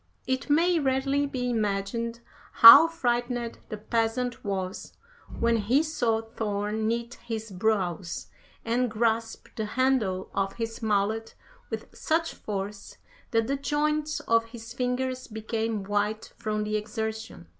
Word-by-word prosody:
It 260 +3 -2
may 335 +3 +4
readily 275 +1 +1
be 255 -2 -3
imagined 225 +2 -2 0.3
how 230 +8 +11
frightened 245 -6 -2
the 215 - -4
peasant 230 +3 -1
was 190 -2 -4 0.5
when 235 0 +3
he 240 +8 +2
saw 240 -8 0
Thor 210 -2 -3
knit 230 +2 -2
his 220 -2 -5
brows, 185 - -1 0.4
and 240 +2 +1
grasp 225 0 -1
the 220 - -2
handle 230 -8 +1
of 195 0 -1
his 225 0 -5
mallet 220 +1 0 0.3
with - - -5
such 330 +1 0
force 200 0 -6 0.3
that 225 -1 +2
the 275 +4 -1
joints 300 +2 -1
of 230 0 +2
his 230 0 -10
fingers 255 +1 -2
became 220 -1 -3
white 205 +2 -2
from 215 -2 -2
the 215 0 -1
exertion. 220 - -5
225 Hz, 130 wpm, -27 LUFS, 215-250 Hz, 0.5 s, how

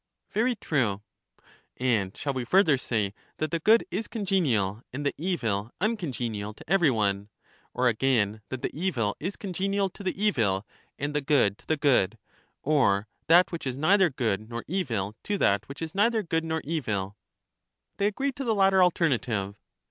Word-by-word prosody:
Very 240 +3 +1
true. 115 - -1 0.7
And 110 -7 0
shall 140 - -2
we 130 -2 -2
further 170 +3 +4
say 110 -6 -1 0.2
that 155 - -2
the 170 - 0
good 220 +7 +4
is 210 +4 -2
congenial, 140 - 0
and 145 +3 -5
the 140 - +1
evil 115 - -1
uncongenial 125 - -2
to - - -15
every 175 -4 +4
one? 100 -4 0 0.5
Or 125 +1 +2
again 110 -3 +1
that 130 -1 -5
the - - -2
evil 135 - -1
is 185 +6 -3
congenial 195 0 -1
to - - -12
the 190 -1 -3
evil, 110 - +1 0.3
and 145 +1 -3
the 150 - 0
good 135 -9 +2
to - - -23
the 160 - +1
good; 120 -8 +2 0.5
or 115 -9 +2 0.2
that 175 +3 +6
which 165 -5 -4
is 130 0 -3
neither 185 +5 +4
good 110 -6 -2
nor 115 0 -5
evil 115 - -2
to 205 - 0
that 100 - +1
which 140 +4 -6
is 160 - -5
neither 220 +2 +2
good 165 -2 -1
nor 160 0 -1
evil. 105 -11 -2 0.8
They 200 - +2
agreed 265 +6 -2
to 275 - -3
the 225 -4 +1
latter 195 -1 +4
alternative. 125 - +1
140 Hz, 170 wpm, -27 LUFS, -, 0.8 s, that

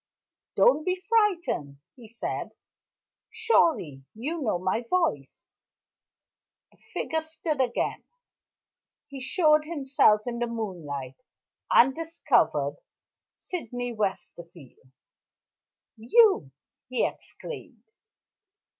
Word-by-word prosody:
"Don't 485 -11 +4
be 365 +2 0
frightened," 370 - 0 0.2
he 240 -4 -13
said. 230 +2 -5 0.8
"Surely 290 - +1
you 300 +9 -4
know 220 -9 0
my 185 +6 -1
voice?" 330 - -1 1.3
The - - -28
figure 320 0 -1
stood 315 -1 -3
still - - +2
again. 240 - -3 1.1
He 275 -1 -8
showed 305 +2 +3
himself 275 -9 +3
in 240 -1 -4
the 240 - 0
moonlight, 170 - -5 0.5
and 265 +3 +6
discovered 330 +2 +1 0.6
Sydney 245 - -4
Westerfield. 170 - -5 1.1
"You!" 250 - +4 0.4
he 255 - +1
exclaimed. 485 - -8
250 Hz, 90 wpm, -27 LUFS, 195-330 Hz, 1.3 s, and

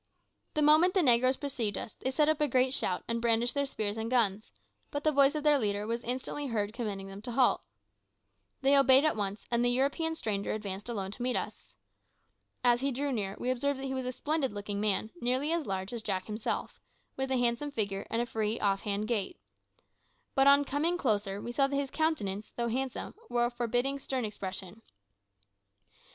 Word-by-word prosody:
The 305 - +2
moment 315 +5 +5
the 375 - +4
negroes 255 0 +4
perceived 245 -7 -2
us, - - -5
they 260 - -3
set 295 +3 +2
up 310 -1 +1
a 300 - +4
great 255 0 +3
shout 185 -8 0
and 230 0 -1
brandished 235 +1 +2
their 280 -1 0
spears 215 -4 -3
and 225 +1 -3
guns, 215 -4 +1 0.4
but 290 - -4
the 310 - +3
voice 280 0 +5
of 300 - -2
their 295 -2 +4
leader 205 -2 -1
was 230 +2 -2
instantly 260 +4 -3
heard 215 -3 -1
commanding 210 -5 -4
them 195 +1 -9
to 245 - -5
halt. 250 +1 +3 1.0
They 275 +1 +5
obeyed 270 +1 +6
at 310 - +2
once, 205 0 -3
and 235 0 +2
the 245 - +3
European 280 +6 +1
stranger 205 -8 -2
advanced 205 0 -5
alone 195 -5 -3
to 240 - -6
meet 250 0 +1
us. - - -6 0.9
As 240 0 +4
he 275 +1 +1
drew 280 +3 -2
near 200 -5 -2
we 250 - -1
observed 270 +2 -1
that 270 - -5
he 265 - -3
was 260 -1 -3
a - - -1
splendid 290 +1 -1
looking 205 0 -4
man, 215 +1 +1
nearly 255 +5 +1
as 335 -3 0
large 190 +2 -3
as 235 - -2
Jack 190 -3 -2
himself, 215 0 -3 0.4
with 265 0 -2
a 260 - +1
handsome 245 +4 +1
figure 200 -7 -2
and 230 +1 0
a - - -3
free, 220 -1 -2
off 195 -1 +1
hand 205 +1 -2
gait. 235 - -2 1.0
But 270 -1 +4
on 280 +1 +6
coming 315 +6 0
closer 205 - 0
we 240 - -5
saw 275 +3 +2
that 280 - -3
his 275 -1 -1
countenance, 215 -11 -1
though 235 -1 0
handsome, 260 +2 -3 0.2
wore 240 0 +2
a 240 - -1
forbidding, 245 +3 -1
stern 260 -3 -2
expression. 195 0 -6
240 Hz, 205 wpm, -30 LUFS, 210-275 Hz, 1.0 s, obeyed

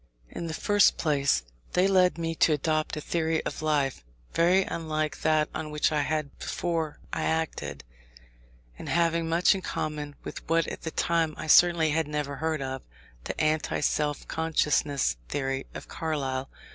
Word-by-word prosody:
In 170 - -5
the 160 - -4
first 205 +2 +4
place, 140 - +2 0.3
they 180 +2 +4
led 185 -2 +4
me 165 -1 -2
to 160 -1 +3
adopt 155 +1 0
a - - -3
theory 160 0 -1
of - - -4
life, 145 - 0 0.3
very 180 +3 +4
unlike 155 -3 -3
that 155 -1 +3
on 155 - -4
which 150 +1 +1
I 150 -1 +1
had 155 -1 -2
before 165 -3 -2 0.2
I - - -1
acted, 75 - -2 1.0
and - - -6
having 165 -1 +1
much 170 +4 +4
in 195 - -4
common 150 -4 -4
with - - -8
what 165 0 +3
at - - -6
that 160 - -6
time 165 -2 +1
I - - -5
certainly 165 0 +5
had 160 0 +1
never 150 -2 -3
heard 160 -2 -1
of, 130 0 -4 0.4
the - - -4
anti 155 0 +1
self 150 -1 0
consciousness 150 - +1
theory 135 -1 -2
of - - -7
Carlyle. 135 -5 -3
155 Hz, 165 wpm, -27 LUFS, 145-165 Hz, 1.0 s, certainly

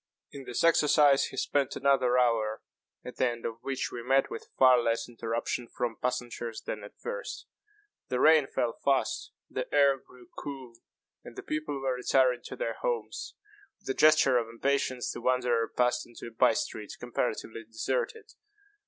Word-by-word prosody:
In 140 -1 -9
this 120 - -2
exercise 150 -3 +5
he - - -8
spent 140 -2 0
another 130 -2 +3
hour, 115 -3 +1 0.4
at 125 - -8
the 130 - +3
end 120 -1 -6
of 115 0 -4
which 135 0 -3
we 120 - -5
met 135 +3 +2
with - - -7
far 130 -1 +7
less 115 0 0
interruption 115 +1 -3
from 120 -1 -3
passengers 120 -2 -3
than - - -5
at - - -12
first. - - -6 0.6
The 125 - -1
rain 155 -2 +6
fell 120 -3 -1
fast; 135 -2 0 0.2
the - - -5
air 140 -2 +4
grew 125 -1 -18
cool; 135 -4 -7 0.5
and - - -11
the - - -7
people 150 -2 -3
were 135 -1 0
retiring 125 0 +2
to - - -7
their - - -3
homes. 485 -2 -3 0.4
With - - -12
a - - +2
gesture 150 -5 +5
of 115 -1 -4
impatience, 130 +1 -1
the - - -7
wanderer 125 -2 +1
passed 125 0 0
into 120 - -11
a 115 - -8
bye 115 - +4
street 105 -2 -4
comparatively 115 -2 -3
deserted. 440 - -3
125 Hz, 170 wpm, -29 LUFS, 120-140 Hz, 0.6 s, far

